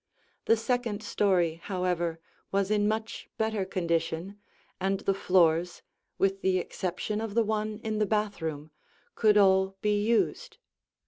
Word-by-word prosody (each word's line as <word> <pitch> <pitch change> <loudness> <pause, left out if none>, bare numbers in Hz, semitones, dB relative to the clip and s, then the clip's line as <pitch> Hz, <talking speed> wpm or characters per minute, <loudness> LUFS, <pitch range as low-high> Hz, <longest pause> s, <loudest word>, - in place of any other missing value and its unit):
The 225 - +4
second 230 -3 -1
story, 175 -6 +1
however, 180 -3 -1 0.3
was 195 +1 0
in 205 -1 +2
much 220 +1 -3
better 220 -3 0
condition, 170 +1 -2 0.4
and 195 +1 0
the 195 - +1
floors, 175 -3 +2 0.3
with 195 0 +1
the 190 -1 +2
exception 185 +4 -3
of 220 -2 -5
the 230 - +4
one 215 0 -2
in 215 -1 -2
the 210 - +2
bathroom, 160 -8 -2 0.4
could 210 -2 +4
all 190 -1 +4
be 210 -1 +2
used. 230 +1 0
195 Hz, 135 wpm, -28 LUFS, 180-215 Hz, 0.4 s, The